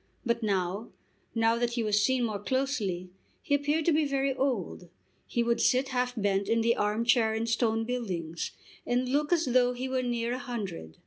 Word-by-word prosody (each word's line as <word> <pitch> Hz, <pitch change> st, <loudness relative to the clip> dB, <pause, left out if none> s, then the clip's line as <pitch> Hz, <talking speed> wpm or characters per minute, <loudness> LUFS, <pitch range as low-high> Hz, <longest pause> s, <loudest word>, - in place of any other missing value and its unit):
But 235 Hz, 0 st, 0 dB
now, 195 Hz, 0 st, -1 dB, 0.5 s
now 225 Hz, 0 st, +3 dB
that 240 Hz, 0 st, 0 dB
he 235 Hz, -1 st, 0 dB
was 210 Hz, -1 st, +2 dB
seen 255 Hz, +3 st, +2 dB
more 215 Hz, -3 st, -1 dB
closely, 205 Hz, -7 st, -1 dB, 0.3 s
he -, -, -1 dB
appeared 295 Hz, +2 st, +1 dB
to 340 Hz, -, +4 dB
be 310 Hz, 0 st, +3 dB
very 275 Hz, -1 st, 0 dB
old. 245 Hz, -10 st, -2 dB, 0.4 s
He 235 Hz, -, 0 dB
would 235 Hz, 0 st, +1 dB
sit 260 Hz, +2 st, +3 dB
half 250 Hz, -1 st, -1 dB
bent 200 Hz, -1 st, 0 dB
in 230 Hz, 0 st, +3 dB
the 235 Hz, +1 st, +3 dB
arm 210 Hz, +3 st, 0 dB
chair 235 Hz, -3 st, +3 dB
in 225 Hz, +1 st, -1 dB
Stone 230 Hz, -1 st, +1 dB
Buildings, 180 Hz, -10 st, -3 dB, 0.3 s
and 250 Hz, +1 st, 0 dB
look 295 Hz, +3 st, +1 dB
as 335 Hz, -2 st, +3 dB
though 250 Hz, -1 st, +3 dB
he 250 Hz, +1 st, -4 dB
were 260 Hz, 0 st, 0 dB
near 240 Hz, -1 st, -1 dB
a 255 Hz, -, -3 dB
hundred. 200 Hz, -, -6 dB
235 Hz, 195 wpm, -29 LUFS, 210-255 Hz, 0.5 s, to